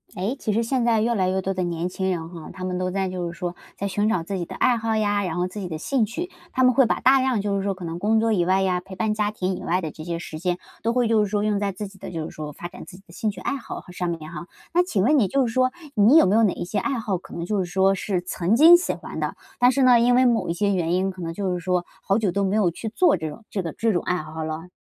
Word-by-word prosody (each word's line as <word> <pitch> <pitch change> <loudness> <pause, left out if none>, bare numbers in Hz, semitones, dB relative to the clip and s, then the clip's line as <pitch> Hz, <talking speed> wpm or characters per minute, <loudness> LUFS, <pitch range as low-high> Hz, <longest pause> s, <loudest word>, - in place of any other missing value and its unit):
哎， 200 +8 -2
其 215 - -1
实 230 +3 +1
现 250 +1 0
在 230 -2 +3
越 235 +2 +1
来 190 -4 +1
越 190 +1 0
多 190 +1 -2
的 185 - -2
年 170 -1 -2
轻 190 +1 -2
人 165 -3 -3
哈， 170 -3 -9
他 185 0 -9
们 180 -1 -2
都 185 0 -1
在 190 0 -1
就 180 -2 -3
是 170 - -13
说， 175 -1 -4 0.2
在 200 - -2
寻 205 +2 0
找 185 -7 0
自 195 +3 -4
己 - - -2
的 - - -9
爱 250 -1 +3
好 225 -1 -1
呀， 205 -1 +1
然 175 -4 -3
后 180 0 0
自 185 +3 -8
己 190 - -4
的 160 -2 -4
兴 250 - 0
趣， 330 - -4 0.2
他 260 - +1
们 255 0 +5
会 265 -1 +5
把 - - 0
大 270 +1 +5
量 255 -5 +1
就 200 0 -1
是 195 - -1
说 200 -1 -1
可 185 -1 -8
能 165 +1 -5
工 220 +3 +2
作 225 0 +2
以 180 -4 +2
外 190 +2 +2
呀， 180 -1 +1
陪 190 +1 -11
伴 220 +2 0
家 210 -1 0
庭 190 -3 -2
以 - - -8
外 180 +2 0
的 160 -3 -4
这 155 - -10
些 170 +1 -3
时 160 -2 -7
间， 180 +1 -1 0.2
都 230 +1 0
会 245 -1 +2
就 220 -1 +3
是 205 - -2
说 205 0 0
用 210 -1 +1
在 200 -1 -1
自 200 +2 -6
己 195 0 -16
的 - - -7
就 165 -3 -4
是 - - -7
说， 150 -1 -6
发 175 +4 -7
展 - - -11
自 180 - -11
己 195 - -18
的 170 - -17
兴 220 +3 -1
趣 200 -3 -6
爱 275 - -2
好 265 - -7
和 180 - -14
上 180 -1 -2
面 160 -2 -5
哈。 170 +1 -7 0.3
那 350 - +5
请 210 - 0
问 285 +5 +4
你 205 - +3
就 270 +7 +2
是 230 - -3
说， 255 +1 +3 0.2
你 220 +6 +6
有 320 - +7
没 190 - +2
有 225 - +5
哪 210 -5 +3
一 - - -5
些 200 +3 -1
爱 275 +5 -1
好， 200 -5 -2
可 - - -12
能 170 - -4
就 205 +2 -1
是 - - -4
说 190 +1 +3
是 195 -1 -1
曾 180 +3 0
经 320 +7 +9
喜 350 - +1
欢 - - -8
的？ - - -2 0.2
但 245 +1 +6
是 270 +1 +2
呢， 250 -2 +7
因 245 +1 +4
为 255 +1 +5
某 235 -6 +2
一 - - +1
些 200 +2 +1
原 170 -3 0
因 190 +1 +1
可 185 -1 -10
能 165 -1 -3
就 190 0 -2
是 180 - -2
说， 180 0 0 0.2
好 195 - +1
久 210 -5 +1
都 200 +3 0
没 195 +1 +1
有 200 -5 +3
去 220 +6 -5
做 350 - +3
这 160 -3 -4
种 215 +9 -12
这 195 - -1
个 165 -4 -5
这 225 -1 0
种 175 - +1
爱 180 - 0
好 160 -1 -6
了？ 160 +3 -5
195 Hz, 360 characters per minute, -24 LUFS, 180-225 Hz, 0.3 s, 经